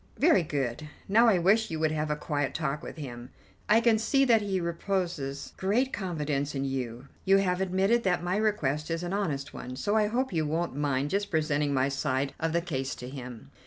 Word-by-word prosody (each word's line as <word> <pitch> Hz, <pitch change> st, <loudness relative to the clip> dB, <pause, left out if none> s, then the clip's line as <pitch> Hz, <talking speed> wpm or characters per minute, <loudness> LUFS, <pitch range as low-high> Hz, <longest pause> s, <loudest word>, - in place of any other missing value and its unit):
"Very 300 Hz, -, +5 dB
good. 145 Hz, -2 st, -3 dB, 0.2 s
Now, 230 Hz, +4 st, +5 dB
I 210 Hz, -5 st, +5 dB
wish 205 Hz, +6 st, +3 dB
you 160 Hz, -, -3 dB
would 155 Hz, -1 st, +2 dB
have 155 Hz, 0 st, -1 dB
a 150 Hz, -, +1 dB
quiet 145 Hz, -2 st, -2 dB
talk 150 Hz, -1 st, -2 dB
with -, -, -8 dB
him. 125 Hz, -4 st, -7 dB, 0.4 s
I 215 Hz, +2 st, +6 dB
can 230 Hz, -2 st, +3 dB
see 275 Hz, +5 st, +3 dB
that 230 Hz, -4 st, +5 dB
he 195 Hz, -2 st, -1 dB
reposes 170 Hz, -5 st, -3 dB
great 235 Hz, +8 st, +1 dB
confidence 150 Hz, -7 st, -2 dB
in 135 Hz, 0 st, -1 dB
you. 130 Hz, -1 st, -4 dB, 0.2 s
You 195 Hz, +1 st, +5 dB
have 185 Hz, -1 st, +1 dB
admitted 190 Hz, +5 st, +2 dB
that 180 Hz, -4 st, 0 dB
my 180 Hz, +1 st, 0 dB
request 160 Hz, -9 st, 0 dB
is 165 Hz, +1 st, -2 dB
an 175 Hz, +2 st, -3 dB
honest 150 Hz, -9 st, -2 dB
one, 125 Hz, +1 st, -7 dB
so 205 Hz, +11 st, -1 dB
I 215 Hz, -1 st, +3 dB
hope 250 Hz, +2 st, -1 dB
you 160 Hz, -2 st, 0 dB
won't 165 Hz, -1 st, -1 dB
mind 145 Hz, -1 st, 0 dB
just 200 Hz, +1 st, 0 dB
presenting 150 Hz, -4 st, +1 dB
my 135 Hz, -1 st, +2 dB
side 135 Hz, 0 st, -1 dB
of 165 Hz, 0 st, 0 dB
the 170 Hz, +1 st, +1 dB
case 135 Hz, -6 st, -3 dB
to 125 Hz, -, -8 dB
him." 125 Hz, -4 st, -9 dB
165 Hz, 210 wpm, -28 LUFS, 140-195 Hz, 0.4 s, I